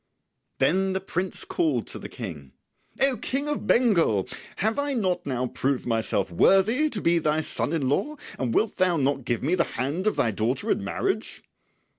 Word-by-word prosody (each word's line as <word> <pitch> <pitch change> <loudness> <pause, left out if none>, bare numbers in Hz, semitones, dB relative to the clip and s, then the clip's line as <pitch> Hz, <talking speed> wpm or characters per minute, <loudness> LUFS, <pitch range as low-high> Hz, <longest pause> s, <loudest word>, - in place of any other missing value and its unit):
Then 190 +2 +2
the 190 - 0
prince 185 -1 -3
called 140 -8 0
to - - -6
the - - -8
King, 75 - -8 0.5
"O 270 -2 +4
King 275 +6 -2
of 295 - -3
Bengal, 170 - +3 0.3
have 220 +6 0
I 285 -1 0
not 185 -7 -1
now 130 -2 -1
proved 130 +1 -1
myself 110 -5 0
worthy 215 - +4
to 215 -8 -3
be 170 0 +3
thy 155 0 +1
son 150 - -1
in 155 -5 0
law, 295 - 0 0.2
and 125 -3 -1
wilt 220 - +1
thou 180 -2 +3
not 135 -2 0
give 120 -3 -1
me 155 +6 +1
the 180 -2 +3
hand 145 - -1
of 215 - +2
thy 115 - +2
daughter 115 +6 -1
in - - 0
marriage?" 100 - -2
165 Hz, 185 wpm, -25 LUFS, 125-200 Hz, 0.5 s, O